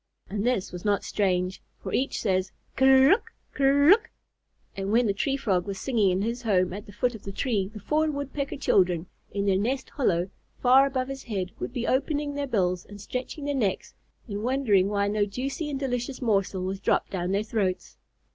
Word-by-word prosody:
And 205 0 -2
this 240 -5 0
was 180 -1 -7
not 205 -1 +1
strange, 185 -2 0 0.2
for - - -7
each 270 +2 0
says, 190 -2 +1 0.2
"Ker 265 0 +6
r - - +7
ruck! 400 +9 +3 0.2
Ker 275 -1 +3
r - - +5
ruck!" 435 +6 +6 0.7
and 195 +1 -3
when 235 +2 +4
the 200 - +2
Tree 270 +7 0
Frog 190 -8 0
was 195 -1 -4
singing 225 -6 +2
in 185 +1 +1
his 235 +2 -2
home 185 -6 +1
at 205 +3 -7
the - - -10
foot 240 +4 0
of 220 - -9
the 195 - -7
tree, 205 -3 -1
the 215 +1 -10
four 305 +9 +1
Woodpecker 280 -1 -3
children, 180 -9 +2 0.2
in 200 0 -2
their 190 -1 +3
nest 260 +6 -2
hollow 185 -9 0 0.3
far 265 +2 +6
above 260 -2 -2
his 270 0 -7
head, 190 -5 -3
would - - -4
be 245 -2 -3
opening 285 +2 0
their 285 0 -2
bills 185 -7 0
and 205 0 -12
stretching 255 +7 -5
their 290 - 0
necks, 210 -9 -1 0.3
and 205 -2 -4
wondering 225 -6 +2
why 200 -1 +1
no 210 0 +1
juicy 270 +9 -3
and 275 -2 -3
delicious 250 -1 -2
morsel 195 -5 0
was 190 +1 -3
dropped - - +1
down 180 -2 -2
their 200 +2 +1
throats. 205 -4 -2
215 Hz, 210 wpm, -26 LUFS, 195-270 Hz, 0.7 s, r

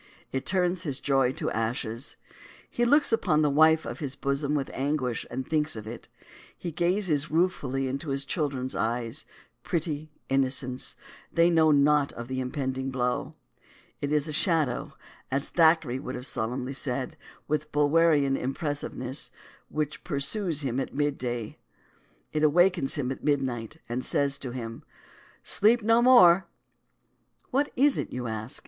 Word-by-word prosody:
It 135 0 -3
turns 180 -1 +1
his 145 -7 -1
joy 135 -2 +2
to - - -3
ashes. 115 +2 -3 0.5
He 240 - 0
looks 285 0 +4
upon 155 -9 +2
the 150 - +2
wife 160 +2 +5
of - - -6
his 140 -4 -4
bosom 140 +1 -1
with 140 -2 -2
anguish 135 -3 -1
as 120 - -7
he 130 - -1
thinks 155 +1 0
of 110 -1 -7
it. 115 +2 -9 0.5
He 175 - -5
gazes 170 -3 +1
ruefully 145 -6 0
into 140 +4 -4
his 135 0 0
children's 135 -5 -2
eyes; 115 +5 -2 0.4
pretty 155 -2 -2 0.2
innocents, 130 -1 0 0.4
they 170 +1 +4
know 160 -2 +4
naught 145 0 +3
of 120 0 -7
the 130 0 -2
impending 130 0 -3
blow. 125 -1 -2 0.6
It 145 - -3
is 150 0 +1
a 155 - -4
Shadow, 155 -6 +1 0.3
as 135 +2 -1
Thackeray 160 -6 +3
would 130 -2 -6
have 125 - -2
solemnly 125 +2 -3
said, 130 -1 -3 0.3
with 150 0 -2
Bulwerian 145 -1 +3
impressiveness, 135 -1 -2 0.4
which 150 -1 -3
Pursues 155 +3 -1
Him 130 -2 -2
at 135 - -4
Mid 145 0 +1
Day. 120 -3 -4 0.7
It 155 - 0
Awakens 170 -1 +3
Him 135 -4 -1
at 135 - -6
Mid 145 -2 +2
Night, 120 +2 -4
and 120 +2 -3
Says 140 -1 +1
to 130 - -4
Him, 115 -2 -6 0.6
Sleep 225 +2 +4
No 230 +2 +4
More! 190 -8 +7 1.0
What 280 +3 +1
is 275 +2 +3
it, - - -3
do - - -8
you 125 -1 -4
ask? 110 +1 -4
140 Hz, 155 wpm, -27 LUFS, 130-160 Hz, 1.0 s, More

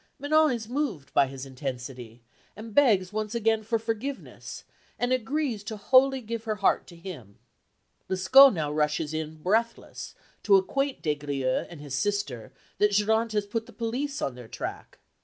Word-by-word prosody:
Manon 310 +2 +3
is 230 -3 -3
moved 240 - -3
by 140 - +4
his 135 0 -7
intensity, 125 -3 -7 0.3
and 220 +1 -9
begs 210 -9 +4
once 215 +1 -3
again 225 -1 +2
for 225 +2 0
forgiveness, 225 +5 -5 0.3
and 245 +1 +1
agrees 255 -2 -1
to 220 0 -5
wholly 260 +5 +4
give 230 0 -5
her 215 -1 -1
heart 200 -1 +1
to 175 - -13
him. 160 - -10 0.7
Lescaut 255 +9 +7
now 155 -7 -2
rushes 150 +1 0
in 155 0 -4
breathless 225 +5 -1 0.3
to 200 - +5
acquaint 275 +8 0
Des 150 - +2
Grieux 140 -3 -2
and 170 - -10
his 145 -3 -8
sister 140 - -2 0.3
that 210 0 +3
Geronte 220 +2 +2
has 210 -1 0
put 225 +2 -3
the - - -14
police 255 +5 -3
on 135 - -1
their 125 -2 -11
track. - - -7
210 Hz, 165 wpm, -27 LUFS, 150-235 Hz, 0.7 s, Lescaut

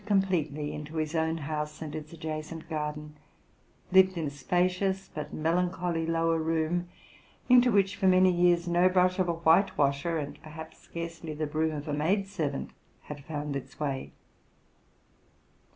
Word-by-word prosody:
181 200 -2 +4
completely 155 -6 -2
into 150 +2 -7
his 155 0 -1
own 160 0 0
house 150 0 -4
and 155 -2 -6
its 155 -1 -7
adjacent 160 0 -6
garden, 150 -1 -4 0.8
lived 190 -1 +5
in 165 - -1
a - - -1
spacious 185 +6 0
but 150 - -5
melancholy 170 0 0
lower 165 0 +1
room, 165 +2 0 0.6
into 245 0 +6
winch 195 -2 +3
for 190 - +1
many 185 0 +6
years 175 0 +3
no 175 +2 +4
brush 185 0 +3
of 180 -2 +2
a - - +2
whitewasher, 165 -2 +2
and 145 -2 -5
perhaps 160 0 -11
searcely 165 -2 -5
the 155 - -1
broom 155 +1 -1
of 145 0 -6
a 150 - -2
maid 180 +7 +1
servant, 155 - -3 0.3
had 145 -1 -8
found 145 -2 -4
its 140 - -7
way. 140 -3 -3
165 Hz, 155 wpm, -29 LUFS, 150-180 Hz, 0.8 s, into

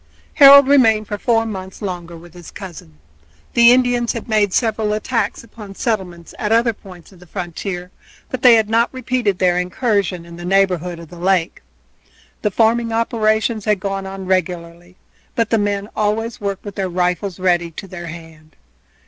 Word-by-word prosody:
Harold 280 -1 +9
remained 225 -7 +4
for 205 - -5
four 225 -2 +1
months 190 -4 -7
longer 175 -4 -6
with 170 0 -15
his 175 -2 -12
cousin. 165 - -11 0.6
The 235 0 +7
Indians 245 -1 +2
had 230 - -6
made 210 -3 +2
several 220 -1 0
attacks 230 +3 -2
upon 210 -3 -12
settlements 185 -8 -3
at 210 - -2
other 230 +1 +3
points 185 -4 -15
of 185 - -18
the 180 - -16
frontier, 180 +1 -6 0.4
but 255 - -5
they 245 -2 +8
had 220 -2 +2
not 230 +2 +2
repeated 250 -6 -1
their 180 -1 +2
incursion 180 -2 -1
in 170 0 -12
the 175 - -9
neighborhood 180 -2 +1
of 165 -2 -12
the 175 - -12
lake. 180 -1 0 0.8
The 210 - +1
farming 230 +3 +1
operations 220 -1 0
had 210 -2 +1
gone 195 0 -4
on 190 0 -7
regularly, 175 -1 -3 0.4
but 230 -2 0
the 225 - +3
men 205 -1 -1
always 225 +3 -1
worked 200 0 -4
with 205 - -6
their 190 -1 -3
rifles 180 +1 -1
ready 175 -2 +1
to 165 +4 -9
their 175 -2 -8
hand. 160 -2 -12
195 Hz, 175 wpm, -19 LUFS, 180-225 Hz, 0.8 s, Harold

